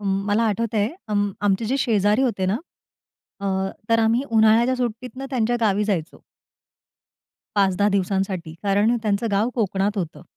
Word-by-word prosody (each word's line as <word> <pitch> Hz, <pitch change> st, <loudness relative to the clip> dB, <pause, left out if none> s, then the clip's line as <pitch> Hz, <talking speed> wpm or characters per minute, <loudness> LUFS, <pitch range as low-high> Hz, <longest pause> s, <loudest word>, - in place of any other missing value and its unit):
मला 200 Hz, +2 st, 0 dB
आठवतंय 220 Hz, -1 st, 0 dB, 0.2 s
अं, 205 Hz, -1 st, +1 dB
आमचे 205 Hz, +2 st, +1 dB
जे 255 Hz, +5 st, 0 dB
शेजारी 210 Hz, -1 st, +2 dB
होते 200 Hz, -8 st, 0 dB
ना, 195 Hz, +3 st, +1 dB, 0.8 s
अ, 200 Hz, -, -3 dB, 0.4 s
तर 230 Hz, 0 st, +3 dB
आम्ही 225 Hz, +3 st, +2 dB
उन्हाळ्याच्या 225 Hz, +3 st, +4 dB
सुट्टीतनं 250 Hz, +2 st, -4 dB
त्यांच्या 240 Hz, -2 st, +1 dB
गावी 210 Hz, -2 st, +2 dB
जायचो. 180 Hz, -6 st, -3 dB, 1.4 s
5-10 200 Hz, 0 st, +3 dB
दिवसांसाठी 190 Hz, -4 st, -1 dB
कारण 205 Hz, +4 st, +2 dB
त्यांचं 210 Hz, +1 st, 0 dB
गाव 205 Hz, +3 st, +2 dB
कोकणात 200 Hz, -2 st, 0 dB
होतं. 170 Hz, -3 st, -5 dB
210 Hz, 135 wpm, -22 LUFS, 195-230 Hz, 1.4 s, उन्हाळ्याच्या